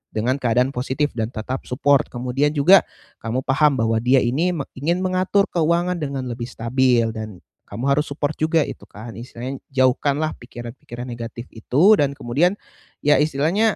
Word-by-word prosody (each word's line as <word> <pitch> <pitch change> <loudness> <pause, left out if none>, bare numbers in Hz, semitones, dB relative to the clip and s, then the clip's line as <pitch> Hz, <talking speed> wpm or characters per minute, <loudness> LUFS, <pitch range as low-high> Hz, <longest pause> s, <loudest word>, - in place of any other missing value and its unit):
dengan 125 +5 0
keadaan 125 +2 +1
positif 135 +3 -1
dan 110 -2 -2
tetap 125 +2 -5
support. 140 +2 +2
Kemudian 125 +4 -1
juga 180 +7 +6 0.3
kamu 120 +4 -3
paham 140 +2 +3
bahwa 115 -2 +1
dia 125 +3 +3
ini 160 +9 0
me 145 - -2
ingin 170 +7 -1
mengatur 185 +2 +2
keuangan 170 +1 +1
dengan 140 -3 -3
lebih 120 -1 -5
stabil 120 -1 +1
dan 110 -4 -8 0.2
kamu 110 +4 -7
harus 150 +2 +1
support 145 +1 -2
juga 160 0 +2
itu - - -8
kan 110 +3 -10
istilahnya, 125 +2 -7 0.2
jauhkanlah 140 +4 +2
pikiran-pikiran 120 +2 -9
negatif 120 +1 -7
itu 150 - +4
dan 140 -1 +1
kemudian, 150 +11 +1 0.5
ya 150 -2 +4
istilahnya, 160 +9 +2
135 Hz, 155 wpm, -21 LUFS, 120-150 Hz, 0.5 s, juga